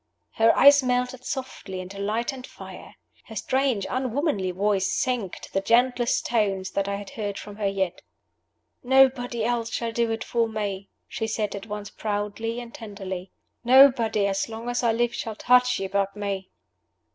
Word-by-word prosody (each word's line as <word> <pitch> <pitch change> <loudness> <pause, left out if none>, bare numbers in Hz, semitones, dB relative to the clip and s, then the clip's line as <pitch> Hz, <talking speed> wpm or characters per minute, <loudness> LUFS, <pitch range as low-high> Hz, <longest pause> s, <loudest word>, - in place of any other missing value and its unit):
Her 225 +1 +3
eyes 285 0 +8
melted 250 0 -1
softly 205 -8 -5
into 185 +2 -8
light 220 +6 -1
and 255 -1 -9
life. - - -10 0.3
Her 220 - -10
strange 260 -2 0
unwomanly 255 - -1
voice 195 +1 +1
sank 240 -8 -1
to - - -12
the 195 - +1
gentlest 240 +2 +2
tones 200 -5 0
that 195 0 -1
I 200 - -1
had 200 -1 -8
heard 205 -3 -4
from 205 0 -9
her 205 -2 0
yet. 190 -2 -2 0.8
"Nobody 250 -3 +3
else 235 -1 -1
shall 235 -1 -2
do 235 0 0
it 225 0 -2
for 230 -1 0
me," 200 -3 -4 0.2
she 225 - -3
said 215 -2 -2
at 200 +2 -7
once 210 -1 -6
proudly 215 +2 -3
and 235 -1 -9
tenderly. 195 -4 -7 0.3
"Nobody, 245 -5 +5
as 195 +2 -1
long 225 +2 -6
as 245 - 0
I 235 -2 +3
live, 240 +1 0
shall 220 -2 -4
touch 250 +2 +3
you 195 - -2
but 195 +1 -1
me." 200 -2 -4
225 Hz, 170 wpm, -25 LUFS, 200-245 Hz, 0.8 s, eyes